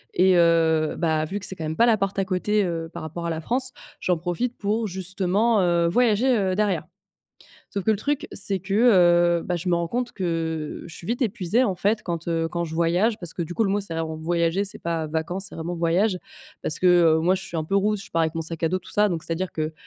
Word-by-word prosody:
et, 185 0 +5
heu, 165 -2 +3
bah, 160 -2 +1
vu 195 +6 -4
que 195 - -6
c'est 190 - -3
quand 160 - -5
même 155 +1 -3
pas 235 - +5
la 230 -2 +4
porte 195 -1 -2
à 195 - +1
côté, 205 +2 +1
heu, 165 -3 -3
par - - -7
rapport 170 +2 -6
à - - -1
la 160 -1 -3
France, 255 +8 -2 0.3
j'en 180 -2 +1
profite 175 +9 -3
pour 215 +2 -1
justement, 190 +4 +1
heu, 170 -1 +2
voyager, 245 +5 +3
heu, 190 -4 0
derrière 210 -1 0 0.9
sauf 200 -2 -3
que - - +3
le 215 - +3
truc, 290 +6 -1
c'est 195 -1 -1
que, 190 +2 -6 0.7
heu, - - -8
bah, 180 - -2
je 175 +2 -4
me 175 - +3
rends 170 0 -1
compte 245 +2 -2
que 165 -4 -3
je - - -11
suis 170 - -10
vite 240 +5 -2
épuisée, 220 0 +1
en 195 - 0
fait, 210 +4 0
quand, 170 -4 -4
heu, 165 -1 0
quand 170 +1 -2
je 160 -1 -7
voyage 175 +7 +1
parce 175 -2 -5
que, 175 - -2
du 170 +1 -6
coup, 225 - +1
le 195 - 0
mot, 205 +1 +1
c'est 195 -4 -4
vraiment 160 -1 -3
voyager, 170 +3 0
c'est 205 +2 -6
pas 165 -2 -2
vacances, 165 +5 -3
c'est - - -13
vraiment 170 +2 -4
voyage 180 +4 +1 0.4
parce 155 - +2
que, 185 - +1
heu, 170 -3 +5
moi, 180 +3 +3
je 190 - -4
suis 170 - -7
un 160 - 0
peu 195 +5 0
roots, 210 +2 +2
je - - -11
pars 165 - +1
avec 160 0 -1
mon 165 - -2
sac 165 +1 -4
à 165 - +3
dos, 185 - 0
tout - - -15
ça, 210 0 +3
donc 165 -3 -3
c'est-à-dire 170 +2 -3
que 155 0 -3
180 Hz, 265 wpm, -24 LUFS, 165-205 Hz, 0.9 s, et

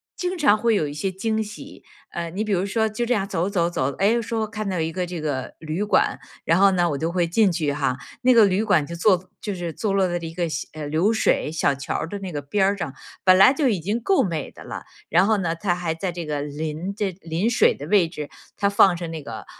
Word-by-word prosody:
经 360 0 -3
常 285 -10 +5
会 230 0 +2
有 155 -7 +1
一 145 - -6
些 170 +6 -2
惊 220 +3 -1
喜， 210 0 -11 0.3
呃， 170 -1 -4
你 200 +4 -2
比 215 - -3
如 185 -1 +1
说 220 +2 +1
就 225 +3 -2
这 245 - +2
样 200 -2 -1
走 175 +2 -1
走 170 -4 +1
走， 135 -6 -1
诶， 225 +4 +2
说 225 0 -2
看 215 -1 -5
到 185 -2 -2
一 160 0 -1
个 180 +1 -2
这 175 -1 -5
个 140 -4 -3
旅 160 +5 -3
馆， 210 - +2 0.3
然 165 +3 +3
后 200 - +7
呢 175 -2 +2
我 - - -1
就 160 +3 -2
会 175 -1 +1
进 200 +3 +3
去 155 -4 -1
哈， 135 -3 -1 0.3
那 255 - +5
个 225 -3 +7
旅 195 +2 +1
馆 185 -9 +3
就 170 - -7
坐 185 0 +2
就 205 -2 -3
是 175 -3 -4
坐 215 - -2
落 190 -1 +3
在 175 - -1
一 165 -1 -5
个 170 0 -1
小 155 - -4
呃， 155 -1 -6
流 165 +8 +2
水 215 -7 +1
小 150 -3 +1
桥 140 +1 -4
儿 - - -2
的 205 - -5
那 190 -2 -6
个 145 - -3
边 195 +7 +1
上， 165 -8 -4 0.3
本 185 -1 +7
来 225 +7 +8
就 285 -1 +1
已 200 -6 0
经 205 +8 -2
够 385 - +3
美 165 -6 -3
的 - - -13
了， - - -7 0.3
然 175 +4 +4
后 220 -1 +3
呢， 170 -4 -1
它 175 +1 0
还 175 -2 -2
在 180 +2 -3
这 170 -1 -6
个 145 -1 -2
临 155 +5 -4
这 205 -2 -1
临 170 +7 -1
水 235 - +4
的 145 - -8
位 185 -3 +4
置， 150 -4 -7 0.3
它 200 - +2
放 195 -2 +5
着 170 -1 -5
那 160 -3 -6
个， 115 -3 -8
180 Hz, 280 characters per minute, -23 LUFS, 160-205 Hz, 0.3 s, 来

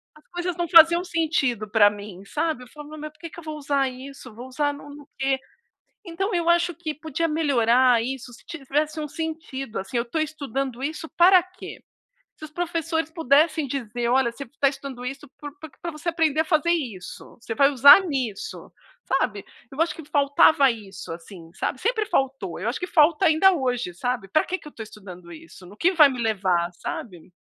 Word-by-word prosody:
as 305 - -21
coisas 350 0 -3
não 345 -1 -1
faziam 340 +1 +7
sentido 295 - -1
pra 205 -1 +5
mim, 205 -2 -10
sabe 305 +1 -2
eu - - -14
falo: 295 +3 -12
"Me 310 - -9
mas 305 0 -7
por - - -29
que 335 - -8
que 340 - -12
eu - - -12
vou 310 -1 -6
usar 280 -2 0
isso? 260 -1 -11
Vou 240 +4 -10
usar 290 +2 -1
não 285 0 -12
no 285 - -10
no 290 -1 -16
quê?". 270 0 0 0.7
Então 380 +4 -3
eu 340 -1 0
acho 345 0 +3
que 315 -3 -5
podia 315 +2 -3
melhorar 255 -5 +3
isso 250 0 -5
se 235 - -16
tivesse 305 0 -2
um 300 - -4
sentido, 310 -6 -5
assim, 240 +6 -6
eu 235 - +1
estou 310 +7 -3
estudando 275 -4 -4
isso 315 +2 -4
para 360 +1 +7
quê? 370 +1 -11 0.5
Se - - -11
os 310 - -9
professores 325 -1 -2
pudessem 310 -1 +2
dizer 240 -3 -3
olha, 250 0 +2
você 275 - -8
está 275 +3 0
estudando 270 -2 -8
isso 275 +2 -7
por 290 -1 -8
por 315 - -9
que - - -28
você 320 +2 -4
aprender 320 -3 +1
a 320 - +2
fazer 315 0 +1
isso, 240 - -4
você 225 -1 -5
vai 280 0 +5
usar 280 +7 +8
nisso, 255 - -4 0.3
sabe. 225 -7 -1 0.3
Eu 275 - -7
acho 330 - +1
que 325 - -10
faltava 285 -1 +4
isso, 205 -6 -8
assim, 165 0 -11
sabe, 255 - -3
sempre 440 -1 0
faltou, 260 - -2
eu 215 - -2
acho 240 - -2
que 360 - -3
falta 330 +2 +3
ainda 325 +5 +5
hoje, 250 - -2
sabe, 240 0 -3
para 310 - +2
que 370 - -3
que 300 - -12
eu - - -13
estou 225 - -8
estudando 180 -5 -12
isso? 165 +3 -13
No 200 +3 -14
que 360 +8 +2
vai 310 -5 +7
me 255 -3 -5
levar, 185 -6 0
sabe. 180 -1 -8
280 Hz, 210 wpm, -24 LUFS, 240-320 Hz, 0.7 s, usar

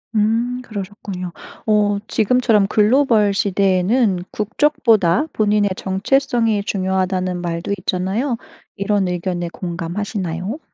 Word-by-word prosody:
음. 230 +4 +1
그러셨군요. 195 -4 -6 0.4
어 210 -1 +3
지금처럼 220 -2 +2
글로벌 215 -1 +3
시대에는 195 +1 +2
국적보다 220 - +2
본인의 210 -1 +2
정체성이 225 +2 +1
중요하다는 185 -2 -1
말도 170 +1 -3
있잖아요. 195 +9 -1 0.4
이런 200 -1 0
의견에 175 -1 -2
공감하시나요? 180 - -4
200 Hz, 285 characters per minute, -19 LUFS, 185-220 Hz, 0.4 s, 어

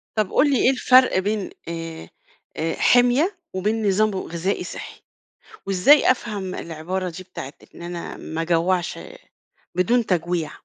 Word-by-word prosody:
طب 215 -3 0
قُل 290 - +4
لي، - - +3
إيه 260 - +5
الفرق 255 -3 +4
بين 205 0 -2 0.2
آآ 165 - -6 0.7
حِمية، 250 +10 +3 0.2
وبين 210 +3 -1
نظام 215 +2 +2
ب - - -6
غذائي 180 +1 -2
صحّي؟ - - -9 0.7
وإزاي 195 +12 +5
أفهم 205 -7 -4
العبارة 175 +3 -4
دي، 175 +2 -9
بتاعة 150 -6 -8 0.2
إن - - -12
أنا 170 0 -6
ما 160 +1 -5
اجوّعش 170 - 0 0.8
بدون 230 +7 +2
تَجويع؟ 175 -3 -1
185 Hz, 135 wpm, -22 LUFS, 170-225 Hz, 0.8 s, إيه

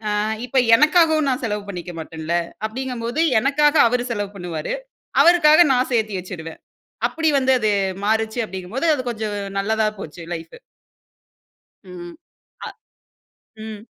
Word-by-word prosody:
ஆ - - 0 0.3
இப்போ 260 +1 +1 0.2
எனக்காகவும் 310 0 +4
நான் 255 -1 -2
செலவு 210 -2 -3
பண்ணிக்க 175 -2 -7
மாட்டேன்ல. 160 +1 -3 0.3
அப்டிங்கும் 250 +1 -5
போது 245 +8 0 0.2
எனக்காக 295 +3 +2
அவரு 245 +1 -1
செலவு 205 -3 -3
பண்ணுவாரு. 175 -5 -5 0.5
அவருக்காக 340 -1 +6
நான் 250 0 +1
சேத்தி 220 -3 0
வைச்சுருவேன். 170 -3 -8 0.5
அப்டி 320 -1 0
வந்து 265 0 +2
அது 215 -2 +1 0.3
மாறுச்சு 220 +2 0
அப்டிங்கும் 190 +1 -8
போது, 275 - 0
அது 265 - -3
கொஞ்சம் 215 -2 -4 0.2
நல்லதா 220 +2 +1
போச்சு 160 +1 -9
லைஃப்ஃபு. 165 0 -10 1.3
ம். 175 -1 -9 0.5
அ. - - -5 0.9
ம். 215 -1 -8
220 Hz, 135 wpm, -21 LUFS, 185-265 Hz, 1.3 s, அவருக்காக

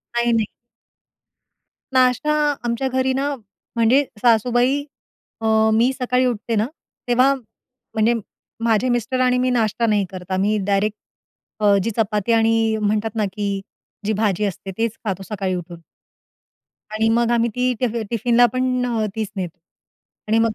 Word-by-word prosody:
नाही, 240 0 +2
नाही. 225 -2 +2 1.5
नाष्टा 255 +4 +3 0.3
आमच्या 235 +3 -1
घरी 260 0 +1
ना, 280 +2 -1 0.4
म्हणजे 235 +5 +4 0.2
सासूबाई 245 +4 +3 0.6
अ, - - -3 0.3
मी 235 +4 +3
सकाळी 250 +1 +1
उठते 230 -1 -1
ना, 215 +1 +2 0.4
तेव्हा 255 +3 +4
म्हणजे 235 -1 -3 0.5
माझे 230 +2 +2
मिस्टर 240 +2 0
आणि 250 0 +3
मी 255 0 +1
नाश्ता 230 -2 +1
नाही 210 -2 +2
करत. 185 0 -9
आम्ही 200 +3 +1
डायरेक्ट 205 +1 +1 0.6
अ, 205 -1 +4
जी 230 - -1
चपाती 210 0 0
आणि 225 -1 +2
म्हणतात 210 +1 0
ना 215 - +1
की 200 -1 -2 0.4
जी 215 - +1
भाजी 210 -1 +1
असते 195 0 -5
तेच 230 -1 -1
खातो 195 -2 -2
सकाळी 190 -3 -2
उठून. 175 -1 -7 1.1
आणि 220 +1 +1
मग 235 +1 +2
आम्ही 235 0 +2
ती 250 0 +1
टिफ 250 -3 0 0.2
टिफिनला 240 +1 +3
पण 255 -1 0
अ, 230 -3 0
तीच 220 -2 -2
नेतो. 180 -3 -5 0.7
आणि 225 +1 +3
मग 225 -1 +2
225 Hz, 145 wpm, -21 LUFS, 210-250 Hz, 1.5 s, म्हणजे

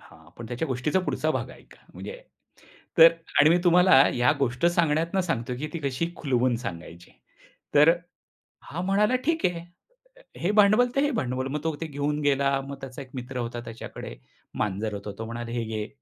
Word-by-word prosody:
हां, 80 -1 -18
पण 115 - -7
त्या 120 +7 -3
गोष्टीचा 135 +7 0
पुढचा 180 - -1
भाग - - -2
ऐका - - -18
म्हणजे, - - -8 0.8
तर 165 0 +10 0.3
आणि 150 +2 +6
मी 175 - +4
तुम्हाला 175 -5 +6
या 125 +4 +3
गोष्ट 125 +3 0
सांगण्यातून 170 +1 +1
सांगतोय 125 -8 -3
की 150 - -4
ती 170 - -3
कशी 150 +6 -2
खुलवून 125 -4 +1
सांगायची 85 -6 -8 0.6
तर 150 +3 +7
अ, - - +4 0.7
हा 170 +4 -6
म्हणाला, 205 +6 +2
"ठीक 325 +1 +1
आहे, 175 -1 0 0.6
हे - - -18
हे 180 - +1
भांडवल 215 +4 +5
ते 275 - +3
हे 290 0 +1
भांडवल." 130 +1 -2
मग 150 - -2
तो 160 -1 -1
ते 165 - -3
घेऊन 145 0 -2
गेला 140 -1 +2
मग 140 - -6
त्याचा 135 0 -8
एक 135 - -11
मित्र 125 +1 -6
होता. 120 0 -4
त्याच्याकडे 115 0 -8 0.5
मांजर 105 +1 -2
होतो 100 0 -6
तो 115 - -4
म्हणाला, 115 +1 -6
"हे 120 -1 -2
घे, 110 -1 -4
140 Hz, 185 wpm, -26 LUFS, 120-170 Hz, 0.8 s, तर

